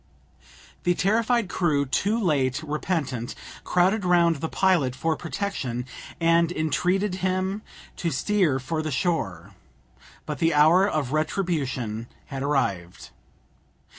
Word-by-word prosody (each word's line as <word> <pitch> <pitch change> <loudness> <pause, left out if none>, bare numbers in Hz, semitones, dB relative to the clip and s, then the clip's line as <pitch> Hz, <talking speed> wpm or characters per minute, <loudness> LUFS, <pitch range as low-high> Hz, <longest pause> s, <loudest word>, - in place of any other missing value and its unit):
The 175 0 +1
terrified 225 +3 +2
crew, 155 -6 +1
too 195 - 0
late 145 - +1
repentant, 145 -6 -2 0.3
crowded 190 +4 +2
round 170 -2 +3
the 160 +3 -3
pilot 170 -10 +2
for 160 +4 0
protection, 155 - -3 0.3
and 165 0 +3
entreated 180 +5 0
him 190 +2 -1 0.4
to 170 - -1
steer 165 0 +1
for 155 +5 -3
the 155 - -3
shore. 105 - -2 0.7
But 150 -3 -5
the 165 -1 +2
hour 165 +6 +6
of 145 -7 -2
retribution 140 - -1 0.2
had 135 -2 -6
arrived. 100 -12 -2
160 Hz, 115 wpm, -25 LUFS, 135-185 Hz, 0.7 s, hour